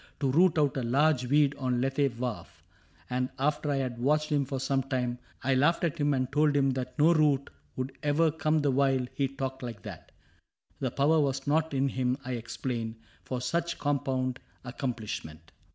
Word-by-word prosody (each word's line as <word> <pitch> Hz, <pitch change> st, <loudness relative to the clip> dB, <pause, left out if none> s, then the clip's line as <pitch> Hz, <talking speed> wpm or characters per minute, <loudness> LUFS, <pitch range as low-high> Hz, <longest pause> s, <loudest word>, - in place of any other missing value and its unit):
To 135 Hz, -3 st, +1 dB
root 170 Hz, +3 st, +4 dB
out 145 Hz, -3 st, +2 dB
a -, -, 0 dB
large 130 Hz, +2 st, +2 dB
weed 145 Hz, +1 st, +4 dB
on 125 Hz, -2 st, 0 dB
Lethe 135 Hz, -1 st, 0 dB
wharf; 105 Hz, -9 st, -5 dB, 0.4 s
And 125 Hz, 0 st, -1 dB
after 150 Hz, +2 st, 0 dB
I 145 Hz, -, +1 dB
had 130 Hz, -3 st, -2 dB
watched 150 Hz, +4 st, +1 dB
him 145 Hz, -2 st, +2 dB
for 135 Hz, 0 st, -3 dB
some 135 Hz, +1 st, +1 dB
time, 125 Hz, -2 st, -2 dB, 0.2 s
I 135 Hz, -, +2 dB
laughed 150 Hz, +7 st, +3 dB
at 170 Hz, -1 st, -1 dB
him 145 Hz, -1 st, +2 dB
and 130 Hz, 0 st, -1 dB
told 150 Hz, 0 st, +3 dB
him 135 Hz, -1 st, +3 dB
that 125 Hz, -1 st, -4 dB
no 160 Hz, +3 st, +5 dB
root 145 Hz, -4 st, +2 dB, 0.2 s
Would 130 Hz, +1 st, -4 dB
ever 150 Hz, +2 st, +2 dB
come 155 Hz, 0 st, +1 dB
the 145 Hz, -1 st, +2 dB
while 135 Hz, -1 st, +2 dB
he 140 Hz, -, 0 dB
talked 135 Hz, 0 st, -5 dB
like 115 Hz, -6 st, -7 dB
that: -, -, -9 dB, 0.7 s
The 130 Hz, -, 0 dB
power 145 Hz, +6 st, +3 dB
was 135 Hz, -2 st, 0 dB
not 155 Hz, 0 st, +1 dB
in 135 Hz, +1 st, +2 dB
him, 130 Hz, -1 st, 0 dB
I 130 Hz, -, -4 dB
explained. 115 Hz, -1 st, -4 dB, 0.3 s
For 125 Hz, -1 st, -3 dB
such 170 Hz, +6 st, -1 dB
compound 130 Hz, -3 st, -1 dB, 0.3 s
accomplishment. 110 Hz, -, -5 dB
135 Hz, 185 wpm, -29 LUFS, 125-145 Hz, 0.7 s, no